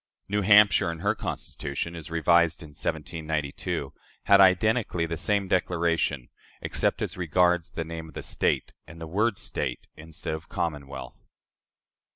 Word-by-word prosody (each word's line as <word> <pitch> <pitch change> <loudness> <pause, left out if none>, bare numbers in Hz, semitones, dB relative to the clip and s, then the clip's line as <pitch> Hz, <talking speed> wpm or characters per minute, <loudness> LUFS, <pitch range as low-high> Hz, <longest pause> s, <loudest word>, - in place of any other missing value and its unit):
New 105 +1 0
Hampshire, 105 -4 +6
in 85 - -8
her - - +2
Constitution, 75 +4 -4
as 80 -2 -8
revised 85 0 +3
in 80 - -11
1792, 75 -2 -3 0.3
had 100 0 +6
identically 95 -1 +3
the 85 0 -3
same 100 +3 0
declaration, 85 -7 0 0.3
except - - -1
as - - -4
regards 90 0 +2
the 80 - -3
name 80 0 -7
of 80 - -15
the - - -5
State - - -1
and 80 +2 -12
the 80 - -6
word 100 +6 0
"State" - - -4
instead 80 +2 -6
of 80 -1 -7
"Commonwealth." 70 -4 -5
85 Hz, 145 wpm, -27 LUFS, 80-90 Hz, 0.3 s, Hampshire